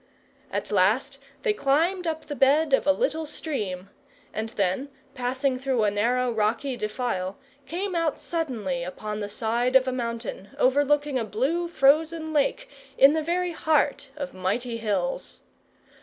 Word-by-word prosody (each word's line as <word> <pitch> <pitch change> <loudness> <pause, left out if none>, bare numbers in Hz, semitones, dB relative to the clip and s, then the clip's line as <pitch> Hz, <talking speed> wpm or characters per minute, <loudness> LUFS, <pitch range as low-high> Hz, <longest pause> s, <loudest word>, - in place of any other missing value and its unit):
At - - -3
last 220 +8 +2 0.2
they 435 - +2
climbed 340 +3 +1
up 315 -1 -3
the 295 - -5
bed 285 +2 +3
of 270 - +3
a - - +7
little 320 -4 -1
stream, 200 - -4 0.4
and 220 +1 -3
then, 205 +6 -1 0.2
passing 260 0 -1
through 260 -4 +1
a 205 - +3
narrow 245 +4 +1
rocky 225 +5 0
defile, 215 -4 -2 0.3
came 370 +6 -3
out 330 -3 0
suddenly 225 - -2
upon 210 +4 -5
the 205 -1 -4
side 235 +4 0
of 265 0 +6
a - - +1
mountain, 230 -5 -4
overlooking 290 +1 +2
a - - -1
blue 275 +11 -1
frozen 315 +1 +2
lake 310 - +1 0.3
in 275 +2 +7
the 320 - +1
very 350 +3 0
heart 300 -3 +1
of 280 -2 -5
mighty 220 +6 -2
hills. - - -2
265 Hz, 150 wpm, -26 LUFS, 220-315 Hz, 0.4 s, a